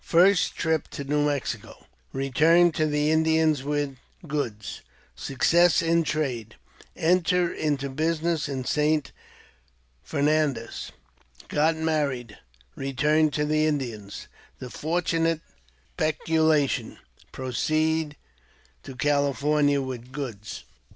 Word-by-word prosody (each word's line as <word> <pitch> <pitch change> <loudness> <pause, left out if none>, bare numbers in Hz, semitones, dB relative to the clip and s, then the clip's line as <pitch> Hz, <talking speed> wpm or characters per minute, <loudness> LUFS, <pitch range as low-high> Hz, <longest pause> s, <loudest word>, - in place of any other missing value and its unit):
First 185 +3 +4
Trip 160 -2 0
to 140 - -6
New 145 +1 +1
Mexico 145 -3 -4
— - - -39
Eeturn 160 +6 +4
to 155 -1 +1
the 150 0 +1
Indians 160 -2 +3
with 145 -1 -2 0.3
Goods 125 -8 -4 0.2
— - - -33
Success 170 +5 +4
in 165 0 +3
Trade 130 -9 -2 0.3
— - - -26 0.2
Enter 180 -1 +1
into 145 -3 -1
Business 160 +2 -1
in 130 -2 -4
St. 150 +1 +1 0.9
Fernandez 145 - -1 0.3
— - - -23
Get 155 +2 +2
Married 145 -8 -1 0.2
— - - -33
Eeturn 150 +3 +2
to 150 - 0
the 155 +1 +2
Indians 120 -9 -4
— - - -28
The 125 -1 -8
fortunate 165 0 0 0.5
Speculation 155 -2 +1 0.2
— - - -27
Proceed 155 +4 -1 0.7
to 135 - -10
Cali 145 +1 +1
fornia 145 0 +2
with 125 -1 -7
Goods. 120 -8 -6
150 Hz, 120 wpm, -26 LUFS, 135-160 Hz, 0.9 s, First